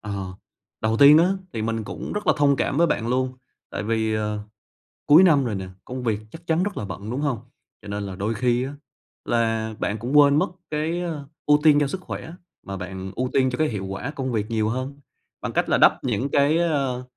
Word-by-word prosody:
Ờ, 100 -3 -4 0.5
đầu 110 +1 +1
tiên 145 +4 +8
á, 175 +2 +4 0.2
thì 110 - -3
mình 115 -1 -2
cũng - - -6
rất 210 0 -4
là - - +6
thông 140 -1 +3
cảm - - -1
với 170 +2 +4
bạn 115 -6 -1
luôn, 130 +1 0 0.4
tại - - -4
vì, 110 0 0
ờ, 105 0 -1 0.7
cuối 155 +6 +8
năm 145 -7 +5
rồi 110 -4 -2
nè, 95 -1 -5 0.2
công 125 0 -6
việc 110 -3 0
chắc 165 +1 -12
chắn 165 +2 +2
rất 205 0 -3
là 105 - -3
bận, 100 +3 -7
đúng 135 +4 -2
hông? 135 -7 -1 0.4
Cho 105 - -12
nên 100 0 -3
là 95 -2 -6
đôi 105 +4 -2
khi 120 +2 +1
á, 140 - -6 0.5
là 115 -1 0
bạn 105 - -1
cũng 125 +7 0
quên 145 -1 +7
mất - - 0 0.2
cái, 160 +3 -1
ơ, 155 -5 -5 0.2
ưu 150 0 +5
tiên 150 -2 +6
cho 145 - +2
sức 185 +5 -5
khỏe 165 -2 -7 0.3
mà 95 0 -5
bạn 95 +1 -6
ưu 125 0 -1
tiên 130 -1 +3
cho 125 - -3
cái 155 0 +2
hiệu 100 -4 -4
quả 100 +9 -4
công 130 -3 -3
việc 110 0 -2
nhiều 110 -1 +1
hơn, 130 +4 -4 0.4
bằng - - -3
cách - - 0
là - - +4
đắp - - +4
những 125 +2 -1
cái, 145 +3 +3
ơ, 140 -7 0
125 Hz, 235 wpm, -24 LUFS, 110-145 Hz, 0.7 s, tiên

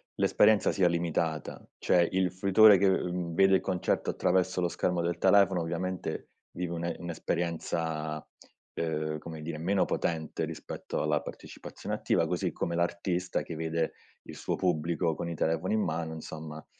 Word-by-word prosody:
l'esperienza 105 -1 +4
sia 95 -3 +3
limitata; 85 -2 -1
cioè 85 -1 +3
il 95 -1 +1
fruitore 100 +2 +6
che, 100 - +4
ehm, 90 -2 -1
vede 95 +1 +5
il 95 - +2
concerto 95 -2 -1
attraverso 95 0 +1
lo 90 - +2
schermo 90 0 -1
del 85 +1 -2
telefono 95 -3 +4
ovviamente 90 +2 -3 0.2
vive 90 -1 -3
un'e 85 0 -2
un'esperienza, 80 -2 -3 0.5
uhm, 75 -1 -2
come 80 0 -8
dire, 80 -1 -5
meno 95 +4 +2
potente 80 0 -2
rispetto 80 0 -5
alla - - +1
partecipazione - - -8
attiva, - - +1
così - - -1
come 85 - -3
l'artista 85 +1 -1
che 85 - -7
vede 80 0 -1 0.3
il - - -10
suo - - -2
pubblico 85 -1 0
con 85 +2 -4
i 85 - -4
telefoni 80 +6 0
in 110 - +2
mano, 80 -1 -2
insomma, 80 -1 -8
85 Hz, 155 wpm, -29 LUFS, 80-90 Hz, 0.5 s, fruitore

